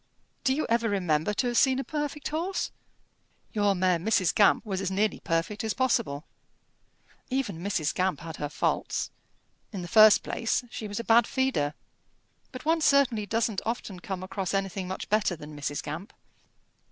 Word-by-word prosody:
Do 265 -1 +2
you 310 - -1
ever 230 0 +1
remember 175 -3 +1
to 255 - 0
have 240 -1 +2
seen 265 -1 +4
a 270 - -1
perfect 295 -1 -3
horse?" 340 +5 -2 0.8
"Your 205 -2 +2
mare 180 -1 +2
Mrs. 185 -1 +2
Gamp 205 +2 +4
was 195 -3 -2
as 190 - -1
nearly 205 +3 0
perfect 165 +7 -1
as 220 -1 -1
possible." 155 - 0 1.0
"Even 260 -10 -2
Mrs. 175 -5 -1
Gamp 185 -4 0
had 165 -1 -7
her 145 - -3
faults. 150 - -1 0.6
In 195 -5 -5
the - - -6
first 215 +2 +7
place 230 +2 -1
she 220 - -5
was 205 +1 -4
a - - -3
bad 230 +1 +5
feeder. 255 - 0 0.8
But 255 0 -9
one 325 +1 +2
certainly 260 -8 +3
doesn't 220 -1 0
often 220 -5 -4
come 185 0 -5
across 190 0 -3
anything 195 -1 -2
much 190 - -5
better 210 -4 +1
than 150 -1 -10
Mrs. 145 0 -3
Gamp." 165 +8 -6
205 Hz, 170 wpm, -28 LUFS, 180-240 Hz, 1.0 s, first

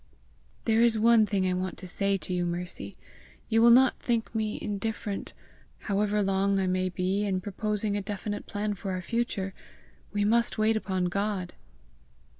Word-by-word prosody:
"There 225 0 +3
is 235 -1 +4
one 225 0 +5
thing 195 -3 0
I 185 - +1
want 185 0 -3
to 185 - -8
say 195 +2 +1
to 180 +1 -5
you, 180 -1 0
Mercy: 175 +1 -3 0.5
you 225 0 +3
will 235 - +7
not 255 +2 +6
think 230 -2 -1
me 215 -1 -1
indifferent 205 -1 -4 0.4
however 205 0 0
long 195 0 +1
I 190 - +1
may 185 0 0
be 185 +3 -1
in 195 -2 0
proposing 210 +1 -2
a 205 - -1
definite 205 +1 -5
plan 210 0 -2
for 195 0 -5
our 185 - -3
future! 205 -4 -2 0.6
We 205 -1 0
must 235 +2 +2
wait 220 +1 +3
upon 190 -4 -1
God!" 195 0 -2
205 Hz, 170 wpm, -28 LUFS, 185-220 Hz, 0.6 s, will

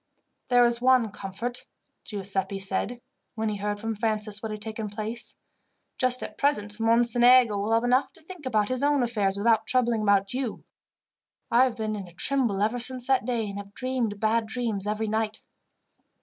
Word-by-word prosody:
"There 245 -1 +5
is 235 0 +1
one 250 -4 +4
comfort," 210 +6 -5 0.4
Giuseppi 195 -3 -2
said, 195 +5 -2 0.3
when 220 -1 -1
he 210 - -3
heard 205 +1 -3
from 225 +1 -3
Francis 215 -1 -2
what 220 - -4
had 215 - -5
taken 215 0 -5
place. 215 +3 -5 0.6
"Just 255 0 +3
at - - -8
present, 210 -7 0
Mocenigo 240 0 +5
will 205 +2 -2
have 225 +1 +3
enough 255 +2 +2
to 330 - -16
think 330 -4 -9
about 215 -4 +1
his 255 0 -1
own 285 -2 +2
affairs 205 -5 0
without 220 +1 +2
troubling 240 -3 +2
about 200 -1 +2
you. 255 -3 -3 0.9
I 240 +3 +6
have 245 -2 -3
been 215 -1 -2
in 195 -3 -6
a 175 - -15
tremble 230 -2 0
ever 225 +3 0
since 250 0 +2
that 265 -3 +2
day, 235 -3 -1
and 200 0 -5
have 200 0 -11
dreamed 250 -5 -2
bad 220 +1 +1
dreams 220 -4 -2
every 215 +1 -1
night." 220 0 -2
225 Hz, 180 wpm, -26 LUFS, 210-245 Hz, 0.9 s, I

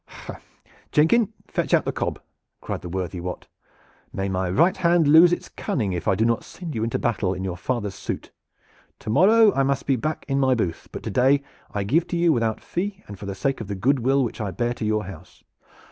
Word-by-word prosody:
"Heh, - - -10 0.5
Jenkin, 210 +9 +3
fetch - - +1
out - - +1
the - - 0
cob!" - - -3 0.4
cried - - -5
the 90 - -7
worthy 90 0 -3
Wat. 90 +1 -6 0.7
"May 95 0 -3
my 95 -1 -1
right 165 - +3
hand 170 -3 +3
lose 160 +4 +8
its 175 - -2
cunning 105 -8 -2
if 90 - -4
I 95 - +3
do 110 +4 +1
not 115 0 +1
send 170 -4 -8
you 110 - -2
into 115 - -1
battle 100 -5 0
in 95 - -5
your 95 -2 -3
father's 105 +1 -3
suit! 100 - -6 0.7
To 110 - -5
morrow 210 - +6
I 135 - +1
must 135 0 0
be 135 - +2
back 155 +6 -3
in 135 0 0
my 130 -1 +3
booth, 90 -8 -3
but - - -7
to - - -4
day 135 +3 +3 0.3
I 100 - -2
give 155 - +1
to 175 - -2
you 170 -1 +4
without 115 -4 0
fee 195 +2 -4
and 100 -2 -9
for 100 - -7
the 100 - -4
sake 135 +4 -1
of 110 - -6
the 100 - -3
good 130 +8 +2
will 135 +3 +2
which 115 - -4
I 105 - -2
bear 120 +5 -1
to 115 - -5
your 110 -1 0
house. 90 -1 -12
120 Hz, 230 wpm, -24 LUFS, 100-155 Hz, 0.7 s, lose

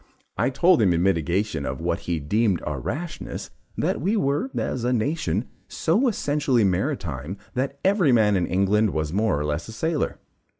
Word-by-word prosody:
I 120 +6 +1
told 170 +5 +4
him 95 -5 +4
in 85 +1 +1
mitigation 95 -1 0
of 65 -1 -3
what - - -1
he 85 -2 0
deemed 100 +5 +1
our 75 -3 -3
rashness, 155 - -5 0.3
that - - 0
we 200 +8 +1
were, 145 - 0
as 125 - -2
a 125 - +1
nation, 115 - 0 0.2
so 210 +12 +1
essentially 145 - +1
maritime, 95 - -1 0.2
that 135 +2 -2
every 190 -7 +4
man 110 -4 +4
in 90 -2 +1
England 100 +2 +2
was 80 0 -1
more 100 -6 +1
or 75 - -2
less 75 +1 -2
a - - -7
sailor. 160 +6 -1
110 Hz, 175 wpm, -24 LUFS, 85-145 Hz, 0.3 s, told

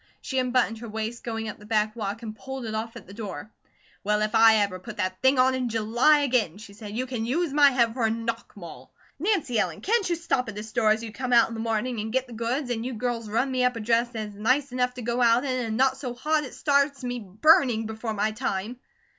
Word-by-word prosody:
She 265 - -2
unbuttoned 250 -3 +1
her 230 0 -8
waist 220 +2 -4
going 225 -1 -4
up 215 - -7
the 210 - -14
back 215 0 +1
walk 215 +1 -4
and 215 -1 -6
pulled 265 +1 -7
it 220 - -4
off 225 +2 -4
at 235 - -10
the 195 - -12
door. 205 -3 -7 0.5
"Well, 210 +1 +1
if 215 - -2
I 225 0 +7
ever 200 -3 0
put 215 +4 -9
that 185 -2 -2
thing 265 +1 +4
on 255 +1 +4
in 255 -2 -1
July 235 +7 +3
again," 240 - +1
she 205 -1 -12
said, 210 +1 -8
"you 255 - -1
can 250 -3 -4
use 290 +6 -1
my 290 -1 +7
head 235 -4 +2
for 245 -1 -2
a 225 - +3
knock 230 +1 -4
maul. 170 -4 -11 0.3
Nancy 330 - +1
Ellen, - - -1
can't 435 -2 +1
you 345 - +1
stop 275 -8 -1
at 205 - -8
a 210 - -4
store 220 0 +1
as 220 +1 +2
you 225 - -6
come 250 +2 -3
out 235 -1 +6
in - - -7
the 225 - -6
morning 225 +1 -1
and 220 +1 -4
get 260 +2 0
the 245 - -12
goods, 245 +4 -2
and 225 -1 -2
you 250 0 -4
girls 230 -1 -3
run 245 +5 0
me 255 -1 +1
up 250 0 +2
a - - -4
dress 230 +2 +1
that 220 -3 -5
is - - -13
nice 255 +6 +1
enough 250 0 0
to 250 - -7
go 240 +2 -1
out 235 +1 +4
in, 265 - -1
and 220 -1 -3
not 265 +1 +3
so 250 -3 -5
hot 300 +4 0
it 255 - -10
starts 280 -2 +1
me 245 0 -3
burning 225 - +3
before 220 0 -4
my 210 +1 0
time?" 215 +3 -3
230 Hz, 265 wpm, -26 LUFS, 220-255 Hz, 0.5 s, I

